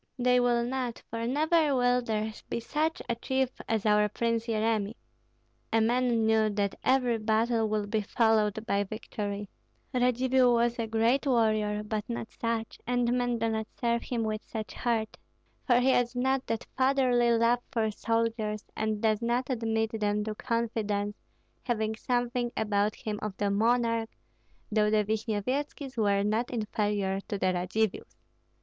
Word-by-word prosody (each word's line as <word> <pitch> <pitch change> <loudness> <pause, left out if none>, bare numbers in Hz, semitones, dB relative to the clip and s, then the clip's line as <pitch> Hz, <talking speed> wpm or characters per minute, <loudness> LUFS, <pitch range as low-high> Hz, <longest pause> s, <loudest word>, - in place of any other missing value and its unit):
They 250 0 +3
will 240 -1 +2
not, 250 -1 -3
for 230 0 -2
never 305 +2 +2
will 245 0 +3
there 220 -2 -2 0.2
be - - -1
such 310 +8 -1
a - - +1
chief 265 +2 0 0.2
as 220 -2 0
our 210 0 +4
Prince 230 +2 -1
Yeremi. 220 -1 0 0.8
A 225 - +3
man 235 0 +2
knew 220 -1 +3
that 205 -1 -1
every 250 -3 +2
battle 220 +1 +1
would 210 -1 -2
be 220 -1 +1
followed 220 0 +1
by 200 -3 +1
victory. 205 -1 -5 0.5
Radzivill 250 0 +3
was 235 0 +1
a 225 - -1
great 230 +6 +2
warrior, 215 -4 +2
but 210 0 -2
not 235 -1 -4
such, 230 -1 -3
and 245 0 +1
men 245 -1 0
do 230 0 0
not 220 -1 -2
serve 235 -1 +1
him 235 -3 -2
with 215 -1 -2
such 220 -2 -6
heart, 225 -3 -1 0.5
for 245 -2 +5
he 260 +2 +3
has 245 -1 +1
not 265 +1 0
that 225 - -2
fatherly 260 -3 +3
love 230 +1 +3
for 225 -4 0
soldiers, 225 -1 -1
and 215 -1 -1
does 215 -1 +2
not 245 +3 0
admit 225 -2 0
them 210 0 0
to 215 0 -3
confidence, 215 -3 -2 0.5
having 220 -3 -1
something 245 +1 -1
about 210 -1 +1
him 210 -1 -4
of 210 -3 -4
the 205 -1 0
monarch, 230 +1 +2 0.6
though 210 0 +3
the 215 0 +3
Vishnyevetskis 240 +6 -2
were 200 -3 +2
not 220 +4 0
inferior 205 -4 -1
to 205 - -2
the 185 -1 +1
Radzivills." 185 +4 -1
225 Hz, 155 wpm, -29 LUFS, 215-245 Hz, 0.8 s, for